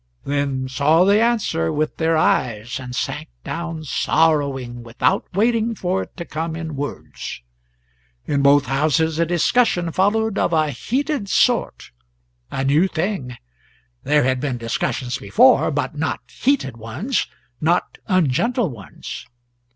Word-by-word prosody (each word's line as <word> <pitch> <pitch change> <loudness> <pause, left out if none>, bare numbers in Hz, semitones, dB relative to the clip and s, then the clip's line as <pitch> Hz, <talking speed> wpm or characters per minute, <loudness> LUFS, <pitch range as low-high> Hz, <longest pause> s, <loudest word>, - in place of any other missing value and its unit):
then 140 -2 -1
saw 145 +6 +3
the 200 +2 +4
answer 225 - +1
with 155 +1 -1
their 165 0 +2
eyes 120 -5 0
and 125 -1 -7
sank - - -3
down 165 -1 -5
sorrowing, 140 -4 +1
without 115 0 0
waiting 230 +2 +2
for 185 -1 -1
it - - -10
to 170 - -5
come 160 +1 -4
in 160 -2 -5
words. 140 - -6 0.8
In 140 -1 0
both 140 +1 +5
houses 155 +4 +1
a 170 - +2
discussion 175 0 +2
followed 205 +4 +1
of - - +1
a 155 -2 +2
heated 260 - -2
sort 245 +3 +1 0.6
a 135 - -2
new 150 +7 +3
thing; 160 - -3 0.6
there 150 0 +3
had 130 0 +1
been 135 -2 -2
discussions 125 +2 -2
before, 250 - +4
but - - -2
not - - -2
heated 245 - 0
ones, 115 - -2 0.3
not 170 +3 0
ungentle 185 - +1
ones. 105 -5 -9
155 Hz, 135 wpm, -21 LUFS, 135-190 Hz, 0.8 s, both